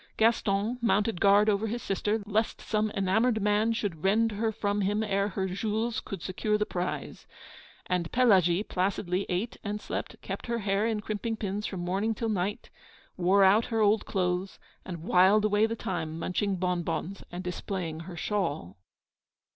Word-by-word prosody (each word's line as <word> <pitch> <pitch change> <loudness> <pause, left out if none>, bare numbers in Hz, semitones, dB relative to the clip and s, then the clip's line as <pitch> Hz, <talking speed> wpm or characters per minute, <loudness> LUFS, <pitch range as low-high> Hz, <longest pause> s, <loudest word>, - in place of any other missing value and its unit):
Gaston 225 0 +2
mounted 210 -4 +1
guard 200 +1 +5
over 210 +1 +2
his 235 +3 -4
sister, 205 +2 -1
lest 215 +2 0
some 215 0 0
enamoured 220 +5 +2
man 210 +2 +2
should 200 -8 -3
rend 220 +4 +3
her 220 +2 -1
from 205 -1 -1
them 205 +2 +1
ere 200 -1 +1
her 190 -1 -2
Jules 220 +4 -1
could 195 -4 -7
secure 210 +3 0
the 210 - 0
prize. 180 -2 -4 0.6
And 180 -2 -1
Pelagie 195 -7 +4
placidly 185 -1 -1
ate 195 +6 -2
and 210 -1 -3
slept, - - -5
kept - - -5
her 235 0 0
hair 205 0 0
in 220 -2 -1
crimping 220 +2 -3
pins 205 0 -3
from 185 -3 -5
morning 195 +5 0
till 225 +1 -2
night, 200 0 -2 0.4
wore 190 +2 +4
out 205 +4 +5
her 225 -2 -1
old 210 +1 +3
clothes, 180 0 -1 0.3
and 170 -3 -7
whiled 190 +4 +5
away 210 +1 +3
the 230 - -3
time 165 -7 -4
munching 190 +4 -1
bonbons 180 0 -2
and 180 +1 -5
displaying 180 -2 -4
her 170 +1 -8
shawl. 160 - -2
200 Hz, 165 wpm, -28 LUFS, 185-215 Hz, 0.6 s, guard